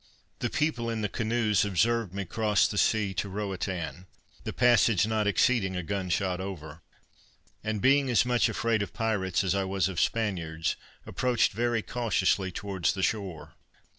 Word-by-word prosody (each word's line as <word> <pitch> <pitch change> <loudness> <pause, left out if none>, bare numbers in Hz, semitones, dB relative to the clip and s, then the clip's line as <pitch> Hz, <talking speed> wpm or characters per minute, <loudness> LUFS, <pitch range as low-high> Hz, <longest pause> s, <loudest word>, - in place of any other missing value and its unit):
The - - -1
people 145 -6 -1
in 115 -1 -2
the 105 - 0
canoes 110 -2 +1
observed 110 +1 +1
me 100 +1 -4
cross 105 +2 +2
the 105 - -2
sea 105 -3 +2
to 100 +1 -3
Roatan, 95 -3 -4 0.4
the - - -2
passage 115 -5 +4
not 110 -1 0
exceeding 100 -2 +2
a 90 - -2
gun 95 +1 -3
shot 90 0 0
over; 80 -5 -7 0.8
and 110 -1 -2
being 135 +1 +4
as 120 -1 +3
much 125 -1 +2
afraid 115 -2 0
of 100 - -4
pirates 100 -5 0
as 95 -1 +1
I 100 -1 0
was 95 -1 0
of 95 -3 -2
Spaniards, 85 -8 -1 0.3
approached 125 -2 +1
very 115 +1 0
cautiously 110 -5 0
towards 95 -2 -2
the 95 - -2
shore. 95 -5 -3
100 Hz, 165 wpm, -28 LUFS, 95-115 Hz, 0.8 s, passage